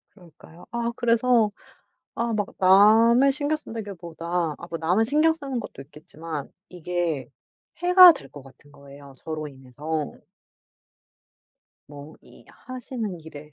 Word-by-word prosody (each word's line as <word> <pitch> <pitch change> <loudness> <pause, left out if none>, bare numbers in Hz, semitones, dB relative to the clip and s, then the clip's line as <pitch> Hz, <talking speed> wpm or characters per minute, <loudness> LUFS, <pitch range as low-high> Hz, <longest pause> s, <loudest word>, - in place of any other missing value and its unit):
그러니까요. 175 -2 -17
아 235 0 -2
그래서 235 -2 +2 0.7
아 235 0 -2
막 205 -2 -1
남을 220 +7 +5
신경 295 +2 -1
쓴다기 225 -8 -8
보다 170 -1 -3
아 170 - -10
뭐 165 - -4
남을 180 +7 +1
신경 305 +5 +3
쓰는 275 -5 -5
것도 205 - -9
있겠지만 150 0 -9 0.2
이게 175 -5 -3 0.5
해가 360 0 +8
될 280 - -12
것 145 - -11
같은 135 +2 -19
거예요, 140 -1 -15
저로 155 0 -6
인해서. 145 +3 -6 1.8
뭐 145 +1 -12
이 - - -19
하시는 240 -7 -7
일에 150 -1 -12
180 Hz, 255 characters per minute, -24 LUFS, 155-235 Hz, 1.8 s, 해가